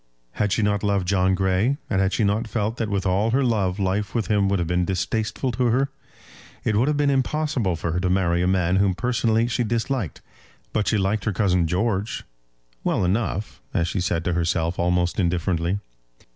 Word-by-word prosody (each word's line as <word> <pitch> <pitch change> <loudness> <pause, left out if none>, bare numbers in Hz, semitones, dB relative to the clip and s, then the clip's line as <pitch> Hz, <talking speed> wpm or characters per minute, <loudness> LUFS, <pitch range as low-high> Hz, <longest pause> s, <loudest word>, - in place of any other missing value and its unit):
Had 105 -1 -1
she 105 - +1
not 105 0 +1
loved 100 -3 0
John 95 0 +2
Grey, 95 +8 +1
and 95 -2 +1
had 95 0 +2
she 110 - 0
not 105 +3 +1
felt 110 +1 -2
that 110 -2 -2
with 100 -2 -1
all 95 +4 +2
her 135 +4 +2
love 100 -7 +1
life 100 +2 -1
with 110 -6 -1
him 100 -2 +2
would 100 - +2
have 85 -2 -1
been 90 +1 +1
distasteful 105 +7 -1
to 125 +2 0
her? 130 +4 +2 0.7
It 110 - +1
would 120 +6 +3
have 150 -1 +1
been 145 -1 +2
impossible 135 - 0
for 80 0 -3
her 85 - 0
to 90 0 0
marry 90 -2 +2
a 90 - +1
man 95 -1 +2
whom 95 -2 +2
personally 115 -1 +1
she 120 +1 0
disliked; 115 - -2 0.5
but 105 - 0
she 110 - +2
liked 100 +1 0
her 105 - 0
cousin 90 -4 +2
George, 95 +4 -1 0.6
well - - +1
enough, 100 +2 -2
as 85 - +2
she 90 +2 -2
said 85 -1 -1
to 90 - +1
herself 85 0 0
almost 90 +1 +1
indifferently. 85 0 0
100 Hz, 200 wpm, -23 LUFS, 90-115 Hz, 0.7 s, would